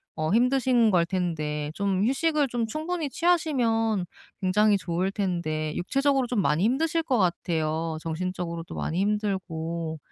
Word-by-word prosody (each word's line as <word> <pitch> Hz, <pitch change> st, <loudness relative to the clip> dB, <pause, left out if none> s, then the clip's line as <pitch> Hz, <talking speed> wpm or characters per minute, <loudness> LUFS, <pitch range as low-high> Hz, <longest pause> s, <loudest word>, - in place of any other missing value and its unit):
어 155 Hz, +1 st, -1 dB
힘드신 245 Hz, -1 st, +3 dB
걸 170 Hz, -2 st, +3 dB
텐데 155 Hz, -5 st, -2 dB
좀 200 Hz, +1 st, 0 dB
휴식을 295 Hz, +2 st, +2 dB
좀 235 Hz, -2 st, -2 dB
충분히 315 Hz, +2 st, -3 dB
취하시면 235 Hz, -, +1 dB, 0.4 s
굉장히 205 Hz, +2 st, +3 dB
좋을 180 Hz, +1 st, -1 dB
텐데 155 Hz, -6 st, -2 dB
육체적으로 270 Hz, +6 st, +1 dB
좀 240 Hz, -4 st, 0 dB
많이 160 Hz, +2 st, +1 dB
힘드실 320 Hz, +7 st, +1 dB
것 270 Hz, -7 st, 0 dB
같아요 165 Hz, -3 st, 0 dB
정신적으로도 170 Hz, 0 st, -4 dB
많이 170 Hz, +3 st, -2 dB
힘들고 170 Hz, -6 st, -2 dB
195 Hz, 310 characters per minute, -26 LUFS, 170-250 Hz, 0.4 s, 힘드신